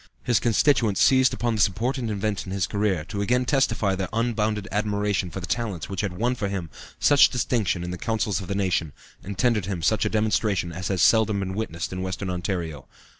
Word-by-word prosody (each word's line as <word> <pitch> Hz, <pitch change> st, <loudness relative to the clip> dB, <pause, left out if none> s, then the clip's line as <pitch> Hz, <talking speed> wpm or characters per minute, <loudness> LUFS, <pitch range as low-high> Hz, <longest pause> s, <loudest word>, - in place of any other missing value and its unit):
His 120 Hz, -3 st, +2 dB
constituents 115 Hz, -3 st, +2 dB
seized 130 Hz, 0 st, +5 dB
upon 120 Hz, -2 st, -1 dB
this 105 Hz, -3 st, +4 dB
important 120 Hz, +5 st, -2 dB
event 105 Hz, -1 st, -2 dB
in -, -, -6 dB
his 95 Hz, -2 st, 0 dB
career 100 Hz, -7 st, -1 dB
to 100 Hz, +3 st, -4 dB
again 125 Hz, +5 st, +1 dB
testify 115 Hz, -7 st, +1 dB
their 95 Hz, -1 st, -2 dB
unbounded 110 Hz, -3 st, -1 dB
admiration 105 Hz, -2 st, 0 dB
for 90 Hz, -, -6 dB
the 90 Hz, -, -5 dB
talents 100 Hz, -7 st, -3 dB
which 95 Hz, -2 st, -2 dB
had 95 Hz, -3 st, -4 dB
won 120 Hz, +5 st, +1 dB
for 105 Hz, -5 st, -3 dB
him 90 Hz, -5 st, -4 dB, 0.3 s
such 145 Hz, -1 st, +6 dB
distinction 115 Hz, -8 st, 0 dB
in 90 Hz, -, -4 dB
the 90 Hz, -, -6 dB
councils 105 Hz, -4 st, -1 dB
of 95 Hz, -, -8 dB
the 100 Hz, -, -2 dB
nation, 90 Hz, -6 st, 0 dB, 0.3 s
and 100 Hz, 0 st, -6 dB
tendered 115 Hz, -7 st, +1 dB
him 90 Hz, -5 st, -3 dB
such 110 Hz, +6 st, +2 dB
a 110 Hz, -, +1 dB
demonstration 105 Hz, -4 st, 0 dB
as 90 Hz, +3 st, -5 dB
has 95 Hz, -2 st, +1 dB
seldom 110 Hz, -2 st, +4 dB
been 95 Hz, -1 st, -3 dB
witnessed 95 Hz, -5 st, -4 dB
in 90 Hz, -, -4 dB
Western 95 Hz, 0 st, -3 dB
Ontario. 85 Hz, -, -4 dB
100 Hz, 210 wpm, -25 LUFS, 95-110 Hz, 0.3 s, such